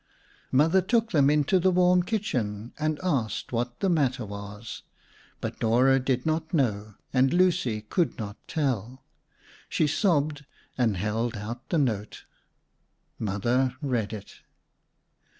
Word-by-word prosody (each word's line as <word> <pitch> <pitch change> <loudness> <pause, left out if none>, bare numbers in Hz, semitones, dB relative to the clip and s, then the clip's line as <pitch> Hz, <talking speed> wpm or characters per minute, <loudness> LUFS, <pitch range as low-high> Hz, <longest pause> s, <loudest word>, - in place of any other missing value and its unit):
Mother 160 +8 +4
took 225 +4 +1
them 145 -5 +4
into 150 +5 +3
the 185 +2 +3
warm 180 0 +4
kitchen 125 - -2
and 155 0 0
asked 135 - -1
what 120 0 -3
the 195 - +2
matter 135 -9 +1
was, 100 +2 -8 0.6
but - - -5
Dora 125 +4 +4
did 130 -1 -1
not 160 0 -1
know, 105 -7 0 0.2
and 130 0 +4
Lucy 175 -11 +2
could 160 +10 -1
not 105 -4 -5
tell. 130 - -2 0.7
She - - +2
sobbed 150 -4 +1 0.3
and 115 -6 +1
held 110 +4 -1
out 120 +5 -7
the 170 - +1
note. 110 -8 -1 1.0
Mother 120 +5 0
read 125 -8 -1
it. 105 -3 -9
130 Hz, 130 wpm, -27 LUFS, 110-160 Hz, 1.0 s, Mother